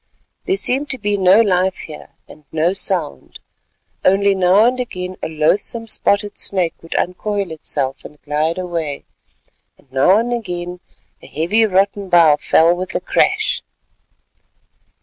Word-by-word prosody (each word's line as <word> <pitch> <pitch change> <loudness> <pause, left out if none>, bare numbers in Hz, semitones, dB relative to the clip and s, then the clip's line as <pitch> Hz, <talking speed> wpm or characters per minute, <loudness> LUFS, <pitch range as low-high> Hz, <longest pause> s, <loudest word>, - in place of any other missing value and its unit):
There 385 - +1
seemed 280 -3 -1
to 260 - +2
be 205 -3 -1
no 190 +2 +5
life 185 -3 +1
here 155 -2 -11 0.2
and 155 - -16
no 160 +3 +1
sound—only 185 - -2
now 190 +3 +4
and 250 +1 +1
again 185 -6 -5
a - - -3
loathsome 175 +9 0
spotted 205 -2 0
snake 180 -4 -1
would 165 - -8
uncoil 200 +1 -2
itself 140 -3 -4
and 150 - -13
glide 155 +3 -1
away, 170 -6 -4 0.7
and 130 - -28
now 135 +9 +4
and 240 +2 -1
again 180 -6 -5 0.4
a - - -14
heavy 210 +9 +1
rotten 195 0 0
bough 165 -4 +5
fell 165 +3 +3
with 185 +1 -6
a - - +1
crash. - - +1
185 Hz, 140 wpm, -18 LUFS, 160-205 Hz, 0.7 s, no